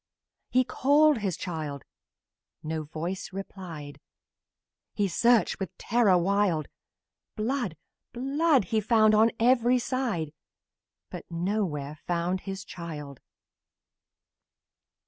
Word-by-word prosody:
He 255 +1 +4
called 285 +1 +3
the 195 -2 0
child 155 -5 -5 0.8
no 160 0 -2
voice 170 +7 -5
replied; 180 -7 -8 1.0
He 205 -2 +1
searched, 235 +5 +3
with 195 -5 -5
terror 220 -5 +3
wild; 185 -3 +1 0.7
Blood! 220 - -2 0.3
Blood! 275 +2 +2
He 220 +4 0
found 215 0 +4
on 220 +2 +6
every 245 +1 +4
side, 235 - -2 0.8
But - - -8
nowhere 170 -5 -2
found 175 +2 0
the 195 - -2
child! 150 -6 -8
195 Hz, 95 wpm, -28 LUFS, 165-240 Hz, 1.0 s, on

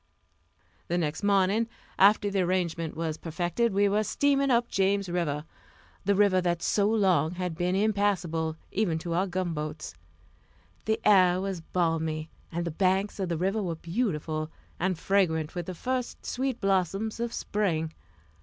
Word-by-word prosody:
The 175 - 0
next 160 -2 -1
morning, 205 +3 +2 0.3
after 205 +1 +5
the 195 -1 +1
arrangement 175 -3 -1
was 160 -1 -2
perfected, 175 +7 -1
we 200 +1 +3
were 210 +2 +2
steaming 275 +4 +2
up 240 -1 +3
James 195 0 +1
River 160 -4 -1 0.6
the 200 +1 +3
river 195 -2 +4
that 175 -1 -1
so 205 0 +2
long 185 -8 +2
had 180 -2 -3
been 180 +2 0
impassable, 190 -6 0
even 190 -6 0
to 165 +1 -4
our 185 +3 +1
gunboats. 165 - -3 0.9
The 220 0 +1
air 185 -3 +6
was 190 -2 -3
balmy, 160 -2 -1 0.2
and 170 +1 -2
the 170 - -2
banks 190 +5 +1
of 190 -2 -1
the 170 - -1
river 195 +5 0
were 175 -4 -2
beautiful, 160 -4 -2 0.3
and 185 0 0
fragrant 160 -4 +1
with 175 -2 -4
the 185 - -5
first 255 +6 -3
sweet 260 -1 -2
blossoms 195 +3 0
of 235 0 -2
spring. 165 -9 -1
185 Hz, 155 wpm, -28 LUFS, 165-205 Hz, 0.9 s, air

